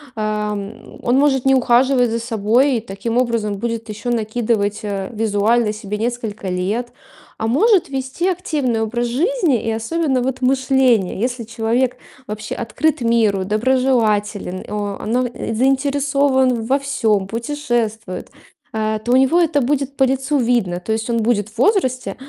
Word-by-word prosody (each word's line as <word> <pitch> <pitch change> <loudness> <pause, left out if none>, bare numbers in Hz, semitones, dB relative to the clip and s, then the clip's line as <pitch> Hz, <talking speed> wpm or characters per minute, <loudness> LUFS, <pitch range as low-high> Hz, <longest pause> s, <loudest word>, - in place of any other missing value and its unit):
а, 215 -1 -1
м, 205 +2 -8
он 245 - +1
может 275 -2 +2
не 270 0 +5
ухаживать 250 0 +3
за 230 - -1
собой 230 +4 +2
и - - -3
таким 225 +3 -4
образом 230 -4 0
будет 230 +2 -4
еще 215 +4 -5
накидывать, 220 -2 0
э, 200 -2 -3
визуально 220 +1 +1
себе 210 -1 -5
несколько 220 -3 -3
лет. 200 +7 -2 0.5
А 220 - -2
может 365 - +3
вести 270 +6 -2
активный 300 - -1
образ 240 +2 -1
жизни, 315 - +1
и 225 - -3
особенно 255 +5 0
вот 260 +1 -2
мышление. 255 -7 +2
Если 245 +1 -2
человек 235 +3 -1 0.3
вообще 215 +1 -5
открыт 250 +6 -1
миру, 225 -5 +2
доброжелателен, 215 -4 0
о 205 -1 -4
но, 245 +3 +1
э, 240 -1 -5
заинтересован 270 -1 +2
во 270 +4 +2
всём, 220 -8 0
путешествует, 230 -5 -3 0.4
а, 215 0 -1
то 240 +3 -3
у - - +6
него 265 +6 +4
это 320 -4 +2
будет 275 +1 -1
по 270 - +4
лицу 270 +2 +1
видно. 230 -8 +1
То 220 +5 -2
есть 220 +2 -3
он 230 -1 +1
будет 215 -3 +1
в 220 - -20
возрасте, 255 - +1
235 Hz, 155 wpm, -19 LUFS, 215-265 Hz, 0.5 s, у